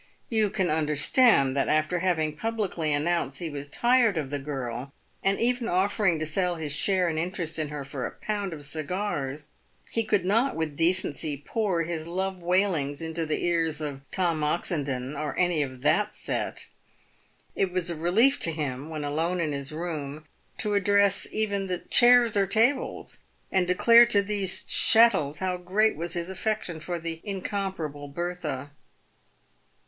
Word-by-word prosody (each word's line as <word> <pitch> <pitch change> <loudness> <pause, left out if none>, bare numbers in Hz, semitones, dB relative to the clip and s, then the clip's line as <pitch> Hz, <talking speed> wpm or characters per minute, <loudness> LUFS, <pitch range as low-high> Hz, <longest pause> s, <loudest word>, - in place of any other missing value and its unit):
You 220 -3 +2
can 185 -3 0
under 155 -1 0
stand 145 - +4
that 140 - +1
after 155 +3 +1
having 160 -4 0
publicly 200 -6 -2
announced 145 -2 0
he 165 0 -5
was 145 0 -6
tired 235 - +2
of 145 -3 -3
the 145 - -2
girl, 135 -2 -5 0.3
and 195 0 +1
even 240 0 0
offering 190 -1 +1
to 155 - -2
sell 175 +3 0
his 155 -3 -3
share 185 +3 +2
and 160 -2 -1
interest 170 -1 -3
in 155 - -1
her 145 -1 -6
for 135 -2 -4
a - - -9
pound 205 -3 -3
of 150 -3 -7
cigars, 150 -2 -4 0.4
he 230 - +1
could 205 -4 0
not 230 +8 +1
with 160 -3 -3
decency 165 -3 +1
pour 195 -7 -1
his 165 -1 -4
love 190 +2 -3
w 175 0 -8
r 180 - +5
ailings 145 -6 -3
into 160 0 -3
the 155 - -1
ears 165 -3 0
of 145 -3 -5
Tom 170 -5 0
Oxendon, 145 -4 -1
or 150 -1 -4
any 175 -4 +2
of 130 -3 -5
that 210 +7 +1
set. - - -3 0.9
It 190 -2 0
was 180 -1 +1
a - - -3
relief 220 - +3
to 165 - +3
him 145 -2 -4
when 155 -2 -5
alone 165 +5 -1
in 155 -3 -1
his 140 0 -4
room 155 -2 -5 0.3
to 210 - +1
address 200 0 +3
even 200 -3 0
the 180 -1 -2
chairs 240 +2 +5
or 200 -1 +2
tables, 235 +7 0 0.3
and 185 -2 +1
declare 230 +6 +6
to 200 -4 +4
these 200 -2 +1
chattels 205 -11 +4
how 185 +1 -2
great 195 +5 +1
was 170 +2 -3
his 170 +2 -4
affection 190 -3 -3
for 175 +2 -4
the 165 -1 -6
incomparable 190 -7 -4
Bertha. 150 -3 -5
170 Hz, 170 wpm, -26 LUFS, 150-195 Hz, 0.9 s, declare